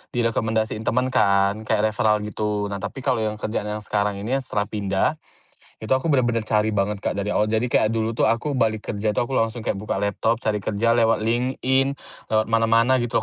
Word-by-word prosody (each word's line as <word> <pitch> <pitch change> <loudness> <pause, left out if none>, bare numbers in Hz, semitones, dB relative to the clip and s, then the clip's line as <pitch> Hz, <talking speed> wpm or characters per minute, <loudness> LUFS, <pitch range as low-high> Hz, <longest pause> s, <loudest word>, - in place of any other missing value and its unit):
direkomendasiin 110 -2 0
temen 125 +3 +1
kan, 100 0 +2
kayak 110 0 +2
referral 105 0 +1
gitu. 105 -1 -2
Nah, 100 - -3
tapi 100 +6 -6
kalau 130 -4 +1
yang 110 -1 -1
kerjaan 105 0 -3
yang 105 0 -4
sekarang 105 -1 -1
ini 100 +4 -5
setelah 105 -6 -2
pindah, 105 +7 -1 0.6
itu 110 - -3
aku 130 +5 0
bener-bener 120 -5 +2
cari 110 0 +1
banget 100 +1 0
Kak, - - -2
dari 100 +1 -2
awal. 105 +1 +2
Jadi, 110 +3 0
kayak 110 -1 +2
dulu 110 0 0
tuh 115 - +1
aku 130 +4 0
balik 110 -2 0
kerja 105 0 -1
tuh - - +1
aku 130 +2 -1
langsung 115 +1 -1
kayak 100 - -2
buka 100 -1 -3
laptop, 110 +3 0
cari 105 -1 0
kerja 105 +3 0
lewat 115 -2 +3
LinkedIn, 130 +3 +1 0.4
lewat 110 -1 +1
mana-mana 115 +3 +3
gitu 120 -2 0
110 Hz, 200 wpm, -23 LUFS, 105-115 Hz, 0.6 s, lewat